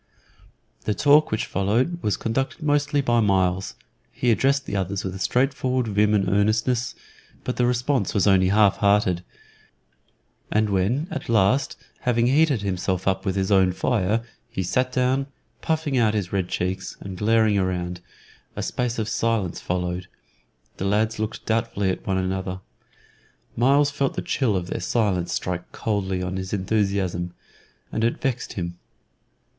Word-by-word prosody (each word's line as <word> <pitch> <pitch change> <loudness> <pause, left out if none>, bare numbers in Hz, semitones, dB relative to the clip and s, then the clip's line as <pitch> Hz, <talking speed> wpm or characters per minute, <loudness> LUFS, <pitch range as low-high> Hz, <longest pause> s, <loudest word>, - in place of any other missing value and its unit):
The 105 - 0
talk 150 +1 +5
which 110 - -1
followed 120 - 0
was 105 - 0
conducted 135 +7 -2
mostly 145 -1 +2
by 120 -3 +2
Myles. 95 -3 +1 0.4
He 120 - +1
addressed 140 +4 +2
the - - -4
others 95 0 -2
with 95 - -4
a 95 - -7
straightforward 130 +2 +1
vim 105 +1 +3
and 100 -2 +1
earnestness, 110 +5 +1 0.5
but 125 - -3
the 125 - +3
response 125 -2 0
was 100 - +3
only 95 -2 +4
half 100 0 +4
hearted, 100 -4 +2 1.3
and 105 -1 +2
when 110 - +1
at 140 - -5
last, 110 +4 +2 0.2
having 120 -1 +1
heated 140 -3 +3
himself 95 -1 -2
up 95 +1 0
with 95 - 0
his 95 0 0
own 95 -2 +4
fire, 110 +2 0 0.3
he 95 - -3
sat 130 +8 0
down, 130 +2 +1 0.3
puffing 155 -5 0
out 110 -2 +3
his 100 -4 -2
red 95 -2 0
cheeks 95 +1 -3
and 95 -1 -7
glaring 110 -2 +3
round, 90 -1 -2 0.5
a - - -3
space 125 -1 -2
of 110 -2 -1
silence 110 -5 0
followed, 90 0 -2 0.7
the 95 - -3
lads 110 +3 +1
looked 110 0 -4
doubtfully 110 -4 0
at - - -6
one 95 -1 +1
another. 95 0 -2 1.0
Myles 140 +4 +4
felt 140 -1 -1
the - - -3
chill 120 -7 0
of 90 -2 -1
their - - -4
silence 95 -7 0
strike 90 +1 -3
coldly 95 -4 -2
on 90 +1 -3
his 95 +1 -5
enthusiasm, 95 -3 -1 0.6
and 110 - -1
it 115 - +1
vexed 130 -2 -2
him. 85 -2 -5
105 Hz, 155 wpm, -24 LUFS, 95-125 Hz, 1.3 s, talk